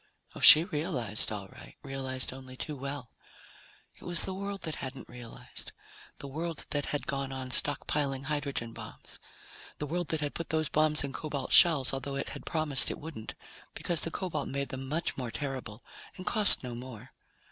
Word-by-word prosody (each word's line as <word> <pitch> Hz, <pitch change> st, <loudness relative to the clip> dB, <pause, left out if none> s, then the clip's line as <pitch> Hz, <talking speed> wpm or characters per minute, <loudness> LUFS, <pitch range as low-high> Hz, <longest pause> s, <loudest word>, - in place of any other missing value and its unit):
Oh, -, -, -9 dB
she 155 Hz, -, +10 dB
realized, 145 Hz, -, -1 dB
all 100 Hz, -2 st, -5 dB
right, -, -, -13 dB
realized 130 Hz, -2 st, -3 dB
only 130 Hz, -1 st, -10 dB
too 150 Hz, -, -3 dB
well. 140 Hz, -2 st, -6 dB, 0.8 s
It -, -, -19 dB
was 175 Hz, -1 st, +2 dB
the 190 Hz, -, -3 dB
world 200 Hz, 0 st, -4 dB
that 160 Hz, -, -4 dB
hadn't 130 Hz, -2 st, -6 dB
realized. 120 Hz, -1 st, -7 dB, 0.4 s
The 140 Hz, -, -7 dB
world 160 Hz, +4 st, -4 dB
that 145 Hz, -1 st, 0 dB
had 145 Hz, -, -2 dB
gone 135 Hz, -1 st, -2 dB
on 130 Hz, -1 st, -5 dB
stockpiling 140 Hz, 0 st, 0 dB
hydrogen 140 Hz, -5 st, -2 dB
bombs. -, -, -9 dB, 0.6 s
The 150 Hz, -, -3 dB
world 175 Hz, +3 st, -2 dB
that 160 Hz, -1 st, -2 dB
had 145 Hz, -1 st, -2 dB
put 165 Hz, -, -4 dB
those 155 Hz, -2 st, 0 dB
bombs 155 Hz, -1 st, +2 dB
in 140 Hz, -1 st, -4 dB
cobalt 145 Hz, -4 st, -4 dB
shells, 155 Hz, -7 st, +8 dB
although 135 Hz, +1 st, -3 dB
it 140 Hz, -, -3 dB
had -, -, -9 dB
promised 155 Hz, -4 st, +2 dB
it -, -, -4 dB
wouldn't, 145 Hz, -8 st, -8 dB, 0.4 s
because 170 Hz, -3 st, 0 dB
the -, -, -1 dB
cobalt 165 Hz, -5 st, -3 dB
made 140 Hz, 0 st, -2 dB
them 130 Hz, -1 st, -6 dB
much 160 Hz, +3 st, -1 dB
more 125 Hz, -2 st, -3 dB
terrible 130 Hz, -5 st, -5 dB, 0.3 s
and 185 Hz, -, -8 dB
cost 210 Hz, -8 st, +7 dB
no 125 Hz, -1 st, -5 dB
more. 125 Hz, 0 st, -9 dB
140 Hz, 180 wpm, -30 LUFS, 130-155 Hz, 0.8 s, she